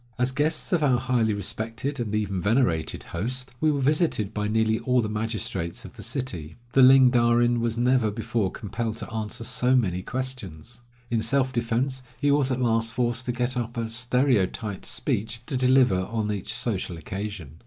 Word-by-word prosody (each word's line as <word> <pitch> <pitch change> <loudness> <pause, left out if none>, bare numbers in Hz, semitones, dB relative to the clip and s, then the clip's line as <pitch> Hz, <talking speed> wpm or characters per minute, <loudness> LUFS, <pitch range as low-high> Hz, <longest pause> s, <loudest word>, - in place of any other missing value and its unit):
As 125 +1 +1
guests 155 +6 0
of 170 - +3
our 135 -4 +3
highly 120 -3 +1
respected 115 +6 -3
and 110 -3 -2
even 100 -3 -1
venerated 100 - +1
host, 125 +9 -4
we 155 - +4
were 145 - -1
visited 135 - +1
by 105 0 -1
nearly 110 +1 +1
all 125 0 +2
the 110 - 0
magistrates 105 -5 -3
of - - -10
the - - -10
city. 90 - -4 0.2
The 135 - +5
Ling 130 -1 +8
Darin 120 0 +3
was 115 -1 -1
never 125 -2 +3
before 110 -1 -1
compelled 110 +2 -4
to 110 - -7
answer 110 0 -3
so 125 +3 +1
many 90 -7 +1
questions. 120 -4 -5 0.3
In 115 -2 +1
self 130 +3 +1
defense 120 +3 0 0.2
he 145 -1 +2
was 140 -2 +2
at 130 - 0
last 115 -2 +1
forced 120 0 0
to 125 - 0
get 125 +1 -2
up 120 -1 -3
a 115 -1 -1
stereotyped 115 -4 0
speech 115 -1 -2
to 140 - -4
deliver 130 -5 +4
on 105 +3 -2
each 100 -3 -4
social 95 -6 -1
occasion. 90 -3 -6
115 Hz, 180 wpm, -25 LUFS, 105-130 Hz, 0.3 s, Ling